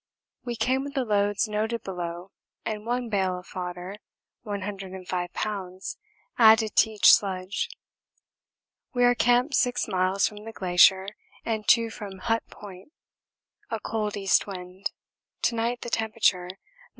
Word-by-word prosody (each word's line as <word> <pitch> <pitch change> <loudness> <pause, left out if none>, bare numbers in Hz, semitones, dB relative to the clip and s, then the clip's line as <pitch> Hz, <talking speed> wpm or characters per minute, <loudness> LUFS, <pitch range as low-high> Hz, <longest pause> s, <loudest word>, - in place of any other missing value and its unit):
We 240 -1 -4
came 255 +4 +1
with 280 0 -7
the 265 -2 0
loads 205 0 +1
noted 220 +2 -2
below 175 0 -5 0.3
and 215 0 -4
one 245 0 -1
bale 190 -4 0
of 180 - -10
fodder 180 +2 -6 0.4
(105 190 -3 -4
lbs.) 190 -3 -4 0.4
added 220 -1 +6
to - - +6
each 215 -1 +7
sledge. 190 -1 0 1.3
We 245 - +3
are 245 0 +6
camped 245 +4 +2
6 245 -2 +1
miles 190 0 +2
from 210 -1 -9
the 225 0 -8
glacier 190 +1 +4 0.4
and 220 -2 -2
2 230 -1 +4
from 200 -4 -8
Hut 225 +4 0
Point 195 +5 -12 0.8
a 225 - -2
cold 210 -1 -3
east 195 0 +2
wind; 185 0 -5 0.5
to - - +2
night 235 +1 -1
the 235 - -6
temperature 215 -5 +1
19°. 185 +2 -9
205 Hz, 140 wpm, -26 LUFS, 185-225 Hz, 1.3 s, each